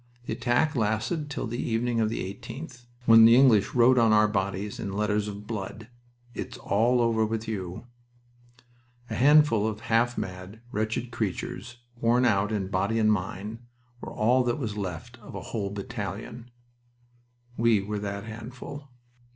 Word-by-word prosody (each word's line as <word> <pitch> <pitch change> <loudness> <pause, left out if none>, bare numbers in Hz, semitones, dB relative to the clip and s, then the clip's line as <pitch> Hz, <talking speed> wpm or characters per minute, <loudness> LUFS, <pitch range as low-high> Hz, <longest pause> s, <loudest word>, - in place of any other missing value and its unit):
The - - -3
attack 130 +5 +1
lasted 120 +8 -1
till 150 - -3
the 120 +2 -3
evening 115 0 0
of 110 -1 +2
the 115 - -3
18th, 125 +2 -10 0.2
when 115 -1 +8
the 115 +1 +8
English 125 -6 +4
wrote 125 +1 +5
on 115 -2 +4
our 105 0 +5
bodies 100 0 -2
in 100 - -4
letters 105 0 0
of 105 0 -7
blood, 110 +1 -6 0.4
'It - - -4
is - - -9
all 120 +4 +2
over 115 -1 +2
with 110 +1 -2
you.' 95 -1 -5 1.3
A - - -1
handful 140 -5 +5
of 105 -1 -4
half 120 +2 +1
mad, 90 +3 -6
wretched 110 +3 -2
creatures, 110 +2 -4 0.2
worn 120 +2 +3
out 105 -2 +2
in 100 -3 -2
body 100 +4 0
and 110 -1 +4
mind, 105 +3 -4 0.4
were - - -6
all 125 +4 +2
that 120 +2 0
was 110 -8 -4
left 105 +5 -6
of 110 - -11
a - - -5
whole 105 -4 -1
battalion. 110 +3 -6 1.1
We 115 -3 +3
were 105 +1 -3
that 100 -1 -4
handful." 120 +6 -9
110 Hz, 160 wpm, -27 LUFS, 105-120 Hz, 1.3 s, when